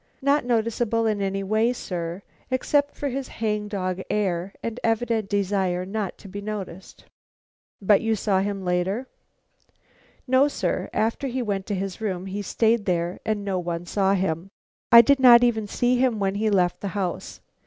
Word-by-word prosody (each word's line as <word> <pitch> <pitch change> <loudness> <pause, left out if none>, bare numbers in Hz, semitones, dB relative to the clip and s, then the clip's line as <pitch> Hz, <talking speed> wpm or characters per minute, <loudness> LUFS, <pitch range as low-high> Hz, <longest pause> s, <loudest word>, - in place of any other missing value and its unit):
Not 280 -1 +2
noticeable 230 -1 0
in 215 -2 0
any 195 0 -1
way, 220 +4 +1
sir, 175 -4 -5 0.3
except 285 +3 +1
for 285 - -3
his 270 +1 -4
hang 210 -2 -2
dog 185 -3 -3
air 190 -3 -1
and 230 +1 -4
evident 225 -2 0
desire 190 -3 0
not 200 -1 -4
to - - -13
be 200 +2 -7
noticed." 200 -3 -7 0.7
"But 200 0 +4
you 225 -1 +1
saw 195 -2 +1
him 195 -1 -3
later?" 180 +7 0 1.2
"No, 260 +2 +4
sir. 290 - -2
After 225 +5 -1
he 255 0 -2
went 200 -3 -3
to 205 - -1
his 195 +1 -4
room 190 -4 -3
he 195 +2 -4
stayed 220 +1 +1
there, 175 -1 -1
and 210 -2 -1
no 190 -2 -1
one 170 -1 -4
saw 195 +1 +1
him. 185 -1 -2 0.4
I 235 0 +11
did 275 +4 +3
not 245 -2 +8
even 220 -3 +1
see 245 +4 +1
him 250 -3 +2
when 195 -1 0
he 215 +2 0
left 180 -4 +1
the 200 - -3
house. 185 -3 -4
205 Hz, 175 wpm, -24 LUFS, 190-230 Hz, 1.2 s, I